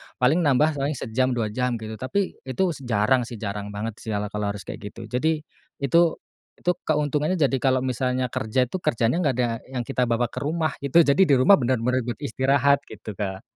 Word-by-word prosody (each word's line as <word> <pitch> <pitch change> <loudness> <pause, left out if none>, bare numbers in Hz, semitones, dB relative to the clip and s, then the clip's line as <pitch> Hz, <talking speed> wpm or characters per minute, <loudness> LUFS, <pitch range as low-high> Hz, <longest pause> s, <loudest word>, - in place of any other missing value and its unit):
Paling 135 +8 +3
nambah 145 +2 +3
paling 140 +2 -1
sejam, 130 +2 0
2 110 -3 -1
jam 125 +2 -1
gitu. 110 -1 -7
Tapi 190 +9 -2
itu 160 +9 0
s 150 - -8
jarang 120 +3 +2
sih, 120 - -7
jarang 100 -1 -5
banget 105 +2 -5
sih 110 -2 -4
ala 105 0 -3
kalau 105 0 -2
harus 100 - -8
kayak - - -7 0.2
gitu. 115 -1 -9
Jadi, 155 +4 0 0.4
itu, 140 +5 +4 0.6
itu 180 - +1 0.2
keuntungannya 150 +2 +1
jadi 140 -4 +2
kalau 130 -1 +2
misalnya 125 0 -1
kerja 110 +4 +1
tuh, 185 +10 -5
kerjanya 120 +5 +1
gak 140 -7 +1
ada 125 -1 +2 0.2
yang 130 -2 -3
kita 125 -2 0
bawa 120 +1 +1
ke - - -5
rumah, 155 +2 0
itu 140 +5 +5
jadi 140 +3 +2
di 155 -7 +5
rumah 130 +10 +6
bener-bener 125 0 +1
buat 120 0 -4
istirahat 140 +2 +2
gitu 110 0 -8
Kak. 95 -1 -4
125 Hz, 205 wpm, -24 LUFS, 115-140 Hz, 0.6 s, rumah